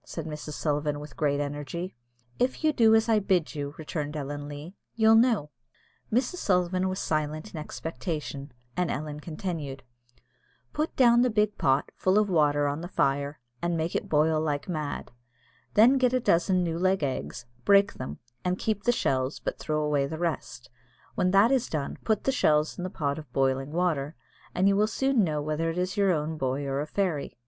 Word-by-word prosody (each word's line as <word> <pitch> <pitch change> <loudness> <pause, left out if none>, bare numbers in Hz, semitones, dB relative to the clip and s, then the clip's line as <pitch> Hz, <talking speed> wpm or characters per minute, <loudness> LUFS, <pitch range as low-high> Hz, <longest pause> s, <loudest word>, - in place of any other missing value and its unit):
said 165 - -6
Mrs. 150 -1 -6
Sullivan 150 -1 -1
with 150 -2 -10
great 145 -2 +1
energy. 145 +5 -4 0.4
"If 255 +5 0
you 310 -1 +3
do 225 -4 +5
as 220 +1 +3
I 220 -2 +4
bid 190 -5 +1
you," 145 -1 -5
returned 150 -1 -4
Ellen 145 0 -5
Leah, 145 +5 -8 0.2
"you'll 220 -1 +5
know." 225 - +3 0.6
Mrs. 250 +10 +1
Sullivan 185 - +1
was 185 - -3
silent 155 +5 -2
in 160 - -5
expectation, 150 -3 -5 0.2
and 180 0 0
Ellen 150 0 -4
continued, 155 -4 -5 0.9
"Put 305 +2 -2
down 240 -2 +6
the 250 - +3
big 210 -2 +1
pot, 135 +1 +2
full 190 +2 +2
of 210 -2 +2
water, 145 -3 +3
on 145 +2 -2
the 175 - -5
fire, 140 -3 0 0.2
and 170 -1 0
make 160 +1 -2
it - - -2
boil 155 +1 +3
like 145 -2 -2
mad; 155 -5 -4 0.6
then 245 +6 +6
get 250 -1 +3
a 255 - +3
dozen 180 -3 +2
new 165 -1 -2
laid 185 -2 +2
eggs, 130 -3 -3 0.2
break 200 +6 +5
them, 130 - -6 0.3
and 180 0 0
keep 215 -1 -2
the 240 - +5
shells, 130 - 0
but - - -4
throw 155 0 -1
away 145 -2 +1
the 160 +2 -5
rest; 150 -8 -4 0.4
when 185 - +1
that 200 +6 +5
is 260 -3 +1
done, 145 -3 -3
put 220 -2 +1
the 270 - +2
shells 155 - +2
in 180 - -6
the 185 - -3
pot 145 -3 -2
of 150 -5 -12
boiling 135 +1 +1
water, 160 -4 0 0.4
and 190 +2 +3
you 200 - +4
will 210 +2 +3
soon 265 0 +2
know 150 -4 -1
whether 155 +2 -1
it 165 - -4
is 180 +1 -1
your 200 -2 +3
own 155 -1 -2
boy 135 +2 -1
or 135 0 -1
a 150 - -4
fairy. 175 -9 -2
160 Hz, 195 wpm, -27 LUFS, 145-195 Hz, 0.9 s, down